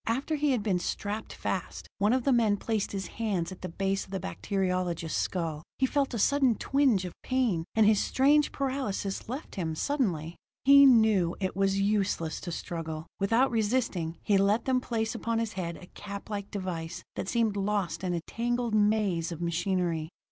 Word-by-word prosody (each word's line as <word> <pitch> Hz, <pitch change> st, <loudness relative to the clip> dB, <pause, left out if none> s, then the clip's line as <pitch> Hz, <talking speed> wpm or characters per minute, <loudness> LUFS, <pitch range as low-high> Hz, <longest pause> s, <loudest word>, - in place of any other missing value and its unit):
After 265 Hz, +7 st, -1 dB
he 300 Hz, -1 st, +1 dB
had 250 Hz, -6 st, +1 dB
been 195 Hz, -4 st, +1 dB
strapped 205 Hz, +4 st, -4 dB
fast, -, -, -4 dB
one 205 Hz, +2 st, +3 dB
of 255 Hz, 0 st, +2 dB
the 275 Hz, -, +2 dB
men 220 Hz, -4 st, +3 dB
placed 215 Hz, -1 st, -2 dB
his 195 Hz, -1 st, -3 dB
hands 195 Hz, -4 st, -2 dB
at 185 Hz, -, -10 dB
the 185 Hz, -, -4 dB
base 195 Hz, +3 st, -1 dB
of -, -, -15 dB
the 195 Hz, 0 st, -3 dB
bacteriologist's 180 Hz, -, -2 dB
skull; 165 Hz, -4 st, -2 dB, 0.2 s
he 265 Hz, -, +3 dB
felt 275 Hz, -1 st, 0 dB
a -, -, -1 dB
sudden 265 Hz, +1 st, +3 dB
twinge 265 Hz, -10 st, +2 dB
of 180 Hz, -, -6 dB
pain; 240 Hz, -11 st, 0 dB
and 220 Hz, -1 st, +5 dB
his 210 Hz, -1 st, +4 dB
strange 290 Hz, +3 st, +3 dB
paralysis 260 Hz, -8 st, -3 dB
left 265 Hz, +5 st, -6 dB
him 165 Hz, -5 st, -3 dB
suddenly. 175 Hz, -, -1 dB, 0.3 s
He 280 Hz, 0 st, +9 dB
knew 220 Hz, -8 st, +4 dB
it 190 Hz, -2 st, -2 dB
was 195 Hz, 0 st, +1 dB
useless 195 Hz, -5 st, 0 dB
to 175 Hz, -, -5 dB
struggle; 160 Hz, -2 st, -5 dB
without 230 Hz, +7 st, +3 dB
resisting, 210 Hz, -7 st, 0 dB
he 200 Hz, -2 st, +3 dB
let 205 Hz, +4 st, +2 dB
them 255 Hz, -1 st, +2 dB
place 225 Hz, -3 st, -2 dB
upon 230 Hz, -1 st, -2 dB
his 225 Hz, -1 st, -1 dB
head 170 Hz, -3 st, -4 dB
a -, -, -12 dB
cap 200 Hz, +3 st, -9 dB
like 200 Hz, -1 st, -4 dB
device 180 Hz, -4 st, -5 dB
that 190 Hz, -, -3 dB
seemed 225 Hz, -3 st, +1 dB
lost 195 Hz, -4 st, -1 dB
in 180 Hz, -1 st, 0 dB
a 170 Hz, -, -2 dB
tangled 240 Hz, +4 st, -2 dB
maze 205 Hz, -5 st, +2 dB
of 170 Hz, -, -6 dB
machinery. 170 Hz, -2 st, -1 dB
200 Hz, 185 wpm, -29 LUFS, 180-230 Hz, 0.3 s, He